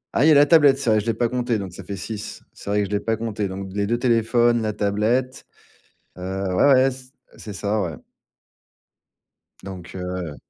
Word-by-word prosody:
Ah! 125 Hz, -, +3 dB
il -, -, +6 dB
y -, -, +7 dB
a -, -, +6 dB
la 145 Hz, +1 st, +7 dB
tablette, 145 Hz, -3 st, +5 dB
c'est 130 Hz, -5 st, 0 dB
vrai, 110 Hz, -, +4 dB
je 110 Hz, -, -5 dB
l'ai 115 Hz, -, +1 dB
pas 120 Hz, -, +1 dB
comptée, 120 Hz, -1 st, -1 dB
donc 95 Hz, -3 st, -6 dB
ça 95 Hz, -, -9 dB
fait 100 Hz, +2 st, -6 dB
6, 105 Hz, +2 st, -7 dB
c'est -, -, -10 dB
vrai 105 Hz, 0 st, +2 dB
que -, -, 0 dB
je 100 Hz, -, -9 dB
l'ai 105 Hz, -, +1 dB
pas 110 Hz, +2 st, -1 dB
comptée, 110 Hz, -2 st, -3 dB
donc 95 Hz, 0 st, -6 dB
d -, -, -12 dB
les 100 Hz, -1 st, 0 dB
2 120 Hz, -, +1 dB
téléphones, 120 Hz, 0 st, +2 dB
la 110 Hz, -1 st, -1 dB
tablette, 110 Hz, +6 st, -1 dB, 0.7 s
heu, -, -, -9 dB, 0.3 s
ouais, 140 Hz, +10 st, +4 dB
ouais, 130 Hz, 0 st, +5 dB
c 130 Hz, 0 st, -11 dB, 0.3 s
heu, -, -, -18 dB
c'est 105 Hz, -, -8 dB
ça, 105 Hz, +2 st, -1 dB
ouais 85 Hz, -5 st, -3 dB, 1.7 s
donc, 95 Hz, -2 st, -9 dB
heu 90 Hz, -4 st, -5 dB
110 Hz, 230 wpm, -22 LUFS, 100-120 Hz, 1.7 s, y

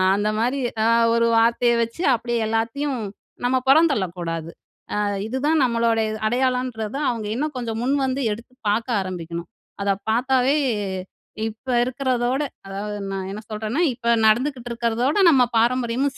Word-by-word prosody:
அந்த 205 Hz, +1 st, 0 dB
மாரி 250 Hz, +5 st, 0 dB, 0.3 s
அ -, -, +4 dB, 0.3 s
ஒரு 235 Hz, 0 st, +3 dB
வார்த்தைய 235 Hz, +1 st, +3 dB
வச்சு, 230 Hz, +10 st, -5 dB
அப்படியே 235 Hz, 0 st, -2 dB
எல்லாத்தையும் 235 Hz, +4 st, -1 dB, 0.5 s
நம்ம 255 Hz, +1 st, +3 dB
புறந்தள்ளக்கூடாது. 180 Hz, -, +2 dB, 0.4 s
அ -, -, -1 dB, 0.3 s
இதுதான் 285 Hz, +6 st, +1 dB
நம்மளுடைய 230 Hz, -2 st, +1 dB
இது 215 Hz, -, -5 dB
அடையாளன்றத 250 Hz, -1 st, -1 dB
அவங்க 225 Hz, -3 st, -3 dB
இன்னும் 300 Hz, +2 st, -2 dB
கொஞ்சம் 225 Hz, -2 st, -3 dB
முன் 270 Hz, +3 st, +2 dB
வந்து, 265 Hz, +1 st, -1 dB
எடுத்து 235 Hz, +4 st, -11 dB, 0.2 s
பாக்க 225 Hz, +3 st, -1 dB
ஆரம்பிக்கணும். 170 Hz, -2 st, -6 dB, 0.3 s
அதை 200 Hz, -, +2 dB, 0.2 s
பாத்தாவே 255 Hz, +4 st, +2 dB, 0.9 s
இப்ப 220 Hz, +5 st, -15 dB, 0.2 s
இருக்கிறதோட, 255 Hz, 0 st, 0 dB, 0.3 s
அதாவது 205 Hz, +2 st, -5 dB
நான் 190 Hz, -1 st, -4 dB
என்ன 210 Hz, +2 st, -6 dB
சொல்றேன்னா, 215 Hz, +7 st, -2 dB
இப்போ 235 Hz, -1 st, -3 dB, 0.2 s
நடந்துகிட்டு 245 Hz, +2 st, +1 dB
இருக்கிறதோட, 235 Hz, +4 st, 0 dB, 0.2 s
நம்ம 260 Hz, -4 st, +5 dB
பாரம்பரியமும் 250 Hz, +3 st, +1 dB
235 Hz, 135 wpm, -22 LUFS, 220-260 Hz, 0.9 s, நம்ம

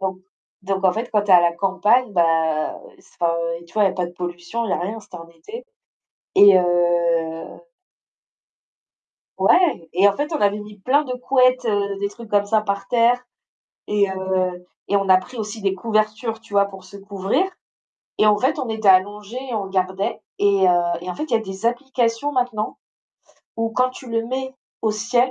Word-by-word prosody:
Donc 190 Hz, -1 st, -2 dB, 0.5 s
donc 190 Hz, 0 st, -2 dB
en 185 Hz, -, +6 dB
fait, 230 Hz, +4 st, -4 dB
quand 210 Hz, -1 st, +3 dB
tu 205 Hz, -, -3 dB
es -, -, +8 dB
à 175 Hz, -, +8 dB
la 170 Hz, 0 st, +2 dB
campagne, 205 Hz, +7 st, +1 dB
bah, 165 Hz, -3 st, +1 dB, 0.2 s
c -, -, -22 dB
enfin, 170 Hz, -1 st, +2 dB, 0.3 s
heu, -, -, -15 dB
tu 170 Hz, -, -21 dB
vois? 215 Hz, -, +3 dB
Il -, -, +4 dB
y -, -, -1 dB
a -, -, -7 dB
pas 180 Hz, -2 st, -2 dB
de 175 Hz, -, -11 dB
pollution, 175 Hz, +6 st, -5 dB
il 220 Hz, -, -3 dB
y -, -, +1 dB
a -, -, 0 dB
rien, 205 Hz, +6 st, -4 dB
c'était 185 Hz, -, -12 dB
en 165 Hz, 0 st, -12 dB
été, 170 Hz, -, -10 dB, 0.7 s
et 200 Hz, -1 st, +8 dB
heu 170 Hz, -2 st, 0 dB, 1.8 s
Ouais, 300 Hz, -, +3 dB
et 190 Hz, +4 st, +5 dB
en 200 Hz, -, +2 dB
fait, 295 Hz, +2 st, -3 dB
on 310 Hz, -, -2 dB
avait 205 Hz, 0 st, +2 dB
mis 210 Hz, 0 st, -11 dB
plein 275 Hz, +9 st, +2 dB
de 255 Hz, -, -5 dB
couettes, 255 Hz, 0 st, +2 dB
heu, 200 Hz, -2 st, 0 dB
des 200 Hz, -, -1 dB
trucs 225 Hz, +2 st, -12 dB
comme 205 Hz, -1 st, +2 dB
ça 215 Hz, +1 st, +2 dB
par 200 Hz, -1 st, -3 dB
terre 240 Hz, +1 st, +3 dB, 0.7 s
et 205 Hz, -1 st, +2 dB
heu, 185 Hz, -1 st, -2 dB, 0.2 s
et 200 Hz, -, +3 dB
on 195 Hz, -1 st, -1 dB
a 185 Hz, 0 st, +7 dB
pris 250 Hz, +7 st, -8 dB
aussi 215 Hz, 0 st, -5 dB
des 195 Hz, -1 st, +1 dB
couvertures, 215 Hz, +2 st, -1 dB
tu 225 Hz, -2 st, -16 dB
vois? 200 Hz, 0 st, +4 dB
Pour 195 Hz, -2 st, -11 dB
se 200 Hz, +2 st, -12 dB
couvrir, 200 Hz, -, -1 dB, 0.7 s
et 215 Hz, -, +4 dB
en 210 Hz, -1 st, +5 dB
fait, 260 Hz, +7 st, 0 dB
on 255 Hz, -, -3 dB
était 220 Hz, -2 st, 0 dB
allongés 205 Hz, +5 st, +2 dB
et 245 Hz, -, -4 dB
on 210 Hz, -, -1 dB
regardait, 190 Hz, +1 st, -2 dB, 0.2 s
et 200 Hz, -2 st, +3 dB
heu, 175 Hz, -1 st, +3 dB, 0.2 s
et 180 Hz, -, -5 dB
en -, -, -5 dB
fait, 305 Hz, -, -4 dB
il -, -, +1 dB
y -, -, +6 dB
a -, -, -1 dB
des 195 Hz, +1 st, -5 dB
applications 245 Hz, +1 st, -1 dB
maintenant 245 Hz, -5 st, -2 dB, 0.8 s
où 225 Hz, 0 st, -1 dB
quand 255 Hz, +2 st, +1 dB
tu 255 Hz, -1 st, -11 dB
le 230 Hz, 0 st, 0 dB
mets 260 Hz, +1 st, -4 dB, 0.3 s
au 220 Hz, -, +2 dB
ciel, 240 Hz, +4 st, +1 dB
205 Hz, 210 wpm, -21 LUFS, 185-230 Hz, 1.8 s, es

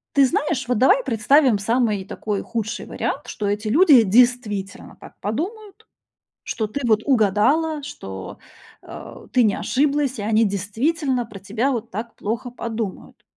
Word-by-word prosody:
Ты 275 Hz, -, +6 dB
знаешь, 270 Hz, 0 st, -1 dB
вот 250 Hz, -3 st, +1 dB
давай 395 Hz, -, +4 dB
представим 240 Hz, 0 st, +3 dB
самый 220 Hz, -2 st, 0 dB
такой 205 Hz, 0 st, -4 dB
худший 230 Hz, 0 st, -4 dB
вариант, -, -, -4 dB
что 205 Hz, -, -4 dB
эти 210 Hz, +2 st, -2 dB
люди 280 Hz, -, +6 dB
действительно 215 Hz, -2 st, +1 dB
так -, -, -14 dB
подумают, 405 Hz, -, -5 dB, 0.6 s
что 220 Hz, -3 st, -2 dB
ты 250 Hz, +7 st, -5 dB
вот 220 Hz, -1 st, +3 dB
угадала, 275 Hz, +7 st, +2 dB
что, 95 Hz, -, -8 dB, 0.4 s
а, -, -, -11 dB
ты 250 Hz, -, +4 dB
не 210 Hz, -3 st, +3 dB
ошиблась 280 Hz, -2 st, 0 dB
и -, -, -3 dB
они 220 Hz, +1 st, +2 dB
действительно 245 Hz, -, -1 dB
про 210 Hz, -2 st, -10 dB
тебя 220 Hz, +7 st, -1 dB
вот 235 Hz, -1 st, -4 dB
так 225 Hz, +3 st, -6 dB
плохо 230 Hz, +4 st, -4 dB
подумают. 225 Hz, -4 st, -6 dB
235 Hz, 150 wpm, -22 LUFS, 210-275 Hz, 0.6 s, Ты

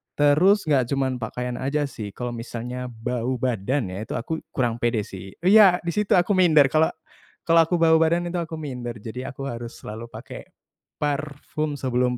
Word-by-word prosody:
Terus 165 Hz, +8 st, +4 dB
nggak 135 Hz, -5 st, +3 dB
cuma 135 Hz, -1 st, 0 dB
pakaian 125 Hz, +1 st, -4 dB
aja 145 Hz, +2 st, 0 dB
sih, 105 Hz, -5 st, -7 dB
kalo 125 Hz, -1 st, -4 dB
misalnya 120 Hz, +2 st, -5 dB
bau 125 Hz, +2 st, -3 dB
badan 120 Hz, -2 st, -1 dB
ya 100 Hz, +4 st, -6 dB
itu -, -, -5 dB
aku 160 Hz, +7 st, -3 dB, 0.2 s
kurang 120 Hz, -3 st, 0 dB
pede 115 Hz, -3 st, 0 dB
sih 95 Hz, 0 st, -10 dB
iya, 195 Hz, -1 st, +7 dB
di 170 Hz, -, -1 dB
situ 210 Hz, -1 st, +1 dB
aku 180 Hz, +3 st, +3 dB
minder, 155 Hz, -6 st, +6 dB
kalo 160 Hz, +1 st, +4 dB, 0.6 s
kalo 165 Hz, -1 st, +6 dB
aku 175 Hz, -, 0 dB
bau 160 Hz, -1 st, +6 dB
badan 170 Hz, +2 st, +2 dB
itu 180 Hz, -, -3 dB
aku 160 Hz, -1 st, -5 dB
minder. 125 Hz, -4 st, -5 dB
Jadi 125 Hz, +4 st, -6 dB
aku 135 Hz, 0 st, -8 dB
harus 120 Hz, 0 st, -6 dB
selalu 110 Hz, +2 st, -7 dB
pake -, -, -10 dB, 0.5 s
parfum 150 Hz, 0 st, -2 dB
sebelum 125 Hz, -1 st, 0 dB
130 Hz, 175 wpm, -24 LUFS, 120-160 Hz, 0.6 s, iya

